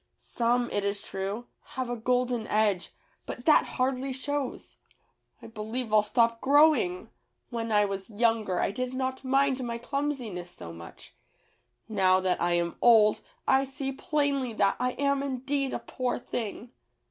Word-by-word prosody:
Some, 240 0 0
it 205 - -1
is 200 0 -1
true, 200 +3 -4 0.3
have 255 -1 -1
a 245 - -2
golden 245 -1 0
edge, 210 -4 +1 0.4
but 245 - -7
that 310 - +6
hardly 260 +1 0
shows. 275 +1 -4 0.7
I - - -8
believe 220 +1 -5
I'll 215 - +7
stop 230 +2 +1
growing. 265 - +3 0.4
When 230 -1 -3
I 210 -1 +4
was 195 0 -5
younger 220 -4 +1
I - - +1
did 255 +4 -4
not 260 0 -2
mind 270 0 +2
my 235 -1 -3
clumsiness 245 -9 -3
so 85 - -10
much. 85 0 -12 0.7
Now 190 -4 +3
that 185 -1 0
I 175 0 +2
am 170 0 -1
old 220 -3 +6 0.3
I 265 0 +4
see 270 0 -4
plainly 280 -4 -1
that 200 -2 +2
I 250 0 0
am 280 0 +1
indeed 275 0 -2
a - - -1
poor 255 -1 -3
thing." 235 0 -5
240 Hz, 155 wpm, -28 LUFS, 210-265 Hz, 0.7 s, I'll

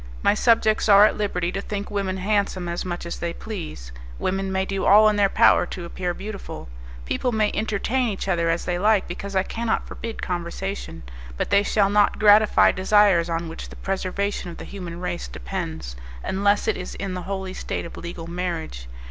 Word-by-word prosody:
My - - +5
subjects 220 -1 +3
are 200 +1 +9
at - - +2
liberty 180 -4 -1
to 195 - -3
think 200 0 -5
women 195 -2 -1
handsome 195 -2 0
as 170 0 -3
much 175 -2 -5
as 170 - -5
they 170 0 -2
please; 165 - -7 0.3
women 195 - -1
may 190 0 0
do 195 0 -3
all 215 +2 +7
in 210 - 0
their 200 -1 +3
power 175 - +5
to 175 - -6
appear 175 0 -3
beautiful; 200 - -7 0.4
people 250 - -1
may 215 -2 +1
entertain 220 +4 0
each 195 -1 -4
other 170 -3 +1
as 165 +1 0
they 175 -1 -1
like, 210 0 +3
because 195 +3 -6
I 190 - +3
cannot 230 +2 -2
forbid 230 -1 -7
conversation; 175 - -4 0.3
but - - -2
they 200 - +6
shall 205 -1 +2
not 205 0 +3
gratify 210 0 +6
desires 190 -3 +4
on 165 0 -2
which 165 - -8
the - - -11
preservation 195 0 -2
of 170 - -9
the - - -8
human 175 -4 -7
race 180 - -4
depends, - - -5 0.3
unless 200 +2 +1
it - - +1
is 180 - -6
in 195 -2 -4
the 180 - -4
holy 190 -1 -3
state - - -4
of 170 - -9
legal 170 -1 -7
marriage. 170 - -4
190 Hz, 195 wpm, -23 LUFS, 175-205 Hz, 0.4 s, are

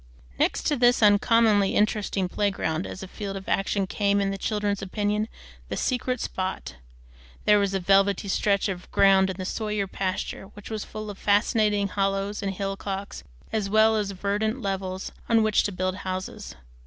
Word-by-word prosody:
Next - - +1
to 295 - +1
this 245 -2 +4
uncommonly 210 -1 +4
interesting 210 -3 +1
playground, 185 -4 -1
as 190 - -7
a - - -7
field 200 0 -6
of 190 - -10
action, 195 0 0
came, 200 +1 +1
in 195 -1 0
the 195 - -3
children's 205 -1 -1
opinion, 210 +2 -1 0.4
the - - -3
"secret 255 -1 -1
spot." 185 - -4 0.7
There 210 0 +6
was 200 -1 0
a - - +1
velvety 195 +2 +3
stretch 200 +1 +1
of 185 -2 -5
ground 195 -1 +5
in 190 - -3
the 185 - -4
Sawyer 210 0 -2
pasture 190 0 -3
which 205 +1 -10
was 215 -1 -3
full 215 -1 -7
of 195 - -12
fascinating 205 0 +2
hollows 195 +1 -1
and 200 -1 -1
hillocks, 195 - -4 0.3
as 210 -3 -1
well 220 +1 +5
as 210 -2 0
verdant 205 +5 -1
levels, 190 -3 -3 0.2
on 225 -1 +4
which 215 -1 +3
to 205 - -1
build 185 0 -2
houses. 185 -1 -5
200 Hz, 170 wpm, -26 LUFS, 195-210 Hz, 0.7 s, There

